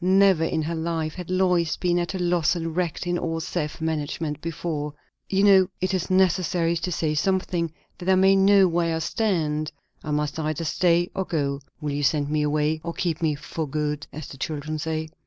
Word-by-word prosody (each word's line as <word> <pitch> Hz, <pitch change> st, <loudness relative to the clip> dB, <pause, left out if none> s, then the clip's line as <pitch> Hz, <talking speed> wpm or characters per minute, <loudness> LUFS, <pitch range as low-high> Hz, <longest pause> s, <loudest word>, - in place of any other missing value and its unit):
Never 190 Hz, -2 st, +5 dB
in 160 Hz, -1 st, 0 dB
her 165 Hz, +2 st, -2 dB
life 160 Hz, -1 st, -2 dB
had 180 Hz, -2 st, -8 dB
Lois 180 Hz, -3 st, +2 dB
been 175 Hz, -1 st, +1 dB
at 175 Hz, +2 st, -2 dB
a -, -, -1 dB
loss 175 Hz, -1 st, +2 dB
and 165 Hz, -1 st, -3 dB
wrecked 180 Hz, 0 st, -1 dB
in 175 Hz, 0 st, 0 dB
all 165 Hz, -1 st, -2 dB
self 160 Hz, -2 st, -3 dB
management 155 Hz, -1 st, -2 dB
before. 155 Hz, -3 st, -4 dB, 0.3 s
"You 195 Hz, 0 st, +2 dB
know, 190 Hz, -2 st, +6 dB
it 185 Hz, +1 st, -1 dB
is 185 Hz, -1 st, -1 dB
necessary 180 Hz, -2 st, +2 dB
to 180 Hz, -, -3 dB
say 155 Hz, -2 st, 0 dB
something, 175 Hz, 0 st, 0 dB, 0.3 s
that 180 Hz, -, -3 dB
I 190 Hz, -, +6 dB
may 190 Hz, +1 st, +5 dB
know 195 Hz, 0 st, +6 dB
where 170 Hz, -1 st, +1 dB
I -, -, 0 dB
stand. 160 Hz, -5 st, 0 dB, 0.3 s
I -, -, -6 dB
must 150 Hz, +1 st, -1 dB
either 155 Hz, +1 st, -2 dB
stay 175 Hz, +1 st, +2 dB
or 190 Hz, -1 st, -2 dB
go. 140 Hz, -4 st, -1 dB, 0.2 s
Will 150 Hz, -1 st, -2 dB
you 145 Hz, +1 st, -2 dB
send 145 Hz, +1 st, +1 dB
me 155 Hz, 0 st, +1 dB
away? 150 Hz, +1 st, +1 dB
or 170 Hz, 0 st, -4 dB
keep 170 Hz, -3 st, -2 dB
me 155 Hz, -2 st, +1 dB
'for 155 Hz, +2 st, -5 dB
good,' 150 Hz, 0 st, -2 dB
as 155 Hz, -1 st, -7 dB
the 135 Hz, -, -10 dB
children 155 Hz, +2 st, -3 dB
say?" 160 Hz, 0 st, -3 dB
165 Hz, 205 wpm, -25 LUFS, 155-180 Hz, 0.3 s, know